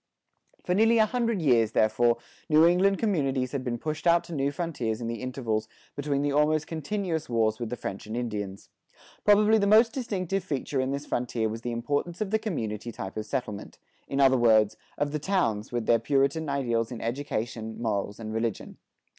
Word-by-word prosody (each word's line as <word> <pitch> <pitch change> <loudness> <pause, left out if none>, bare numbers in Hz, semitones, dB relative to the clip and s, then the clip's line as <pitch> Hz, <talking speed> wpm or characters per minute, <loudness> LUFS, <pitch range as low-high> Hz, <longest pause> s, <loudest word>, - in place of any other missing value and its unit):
[73:1] - - -33
For 180 - +1
nearly 225 +4 +4
a 220 - +6
hundred 230 -3 -1
years, 115 -6 +4
therefore, 115 +2 +3 0.3
New 155 +1 +6
England 190 +3 +4
communities 135 - 0
had 140 -2 -3
been 120 -2 -2
pushed 155 +6 -3
out 170 0 +5
to 170 - -9
new 140 -2 0
frontiers 140 -10 -3
in 120 - -5
the 115 0 -4
intervals 120 -4 -2 0.3
between 145 -1 -1
the 145 - +1
almost 150 +2 +2
continuous 165 0 -3
wars 110 -2 +1
with 120 -2 -3
the 125 - -3
French 100 +2 -6
and 110 +2 -4
Indians. 105 -5 -4 0.5
Probably 210 +1 +5
the 200 - +2
most 225 +3 +5
distinctive 195 -7 -2
feature 140 -5 -2
in 130 - -1
this 140 +1 -3
frontier 120 -4 -1
was 115 +1 -5
the 120 - -3
importance 145 +8 -2
of 210 -2 -2
the 220 - +2
community 120 - -3
type 95 -3 -7
of 110 0 -4
settlement; 125 -7 -4 0.3
in 135 - -2
other 135 -1 +5
words, 110 -2 +4 0.2
of 145 0 0
the 150 - -2
towns, 140 - 0
with 120 -2 -2
their 115 - +4
Puritan 140 +5 +1
ideals 120 -5 0
in 120 - -5
education, 115 -3 -4
morals, 105 -2 -2
and 110 -1 -5
religion. 115 -1 -3
135 Hz, 195 wpm, -27 LUFS, 115-170 Hz, 0.5 s, a